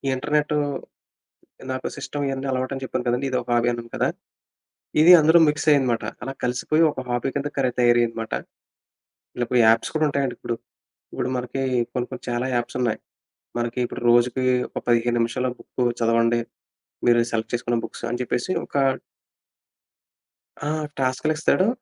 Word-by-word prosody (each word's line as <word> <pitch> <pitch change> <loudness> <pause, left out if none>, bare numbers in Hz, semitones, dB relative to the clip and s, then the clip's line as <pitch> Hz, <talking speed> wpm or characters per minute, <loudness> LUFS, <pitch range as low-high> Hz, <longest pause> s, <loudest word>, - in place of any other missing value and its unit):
ఇంటర్నెట్టూ 150 +2 0 1.1
నాకు 130 0 -3
సిస్టమ్ 145 -1 -4
ఇయన్నీ 135 0 -3
అలవాటని 130 +1 -2
చెప్పాను 130 -1 -3
కదండీ! 125 +3 +1
ఇదొక 125 -1 -2
హాబీ 120 0 +2
అన్నాను 115 -1 -6
కదా! - - +1 0.9
ఇది 170 +3 +8
అందులో 160 +2 +6
మిక్స్ 150 +1 0
అయ్యిందమాట. 130 -5 +2 0.2
అలా 135 +2 -4
కలిసిపోయి 125 +6 +1
ఒక - - -7
హాబీ 120 +2 0
కింద 145 +1 -1
కరె 130 -2 +2
తయారయ్యిందమాట. 120 -2 +2 1.0
ఇలా 125 - -1
ఇప్పుడు 125 +1 +1
యాప్స్ 115 0 +3
కూడా 155 0 +3
ఉంటాయండి 135 -3 -1
ఇప్పుడు. 120 - -3 0.6
ఇప్పుడు 125 - -2
మనకి 125 +2 -4 0.3
కొన్ని, 125 -1 -2
కొన్ని - - -7
చాలా 120 +2 -1
యాప్స్ 120 +1 -2
ఉన్నాయి. 120 -3 0 0.6
మనకి 120 +1 -2
ఇప్పుడు 120 - -7
రోజుకి 120 +2 +3 0.3
ఒక - - -4
15 120 0 +2
నిమిషాల 115 +2 0
బుక్కు 125 - -3 0.2
చదవండి. 115 +1 +3 0.7
మీరు 120 -1 +5
సెలెక్ట్ 110 0 -2
చేసుకున్న 120 0 0
బుక్స్ - - -8
అని 120 - -2
జెప్పేసి 125 +8 -1
ఒక - - -17 1.9
ఆ! - - 0 0.3
టాస్క్‌లిస్తాడు. 155 +8 +1
125 Hz, 145 wpm, -23 LUFS, 120-135 Hz, 1.9 s, ఇది